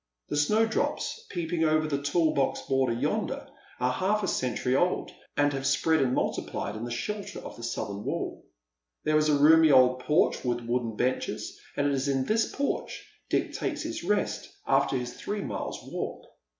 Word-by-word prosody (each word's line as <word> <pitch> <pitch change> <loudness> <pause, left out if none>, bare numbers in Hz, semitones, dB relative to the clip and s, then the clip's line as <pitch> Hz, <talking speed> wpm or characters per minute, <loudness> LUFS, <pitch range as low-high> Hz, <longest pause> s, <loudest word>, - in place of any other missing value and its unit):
The - - -1
snowdrops 220 - +1
peeping 170 -2 -1
over 155 0 +3
the 140 -2 -1
tall 155 +2 +2
box 135 -1 +1
border 135 -3 +1
yonder 115 - -1 0.3
are 125 0 +2
half 205 +8 +1
a - - 0
century 125 -3 0
old, 175 +6 +1 0.3
and 145 0 +3
have 135 0 -1
spread 160 +3 +3
and 130 -1 +2
multiplied 105 - -2
in 110 - -5
the - - -5
shelter 205 - -4
of - - -8
the - - -11
southern 105 -3 -4
wall. - - -3 0.6
There 155 0 +3
is 155 0 +2
a 145 - +4
roomy 160 +2 +7
old 130 -2 +6
porch 150 +6 +2
with 120 -1 0
wooden 120 -1 -1
benches, 125 +4 -1 0.2
and 145 - +2
it 145 - +2
is 135 +1 0
in 135 -1 +1
this 220 +1 +1
porch 280 0 -3 0.2
Dick - - 0
takes - - -2
his - - -4
rest - - 0 0.2
after 135 - +2
his 125 -1 -4
three 205 0 -4
miles - - -4
walk. - - -5
140 Hz, 180 wpm, -28 LUFS, 125-160 Hz, 0.6 s, roomy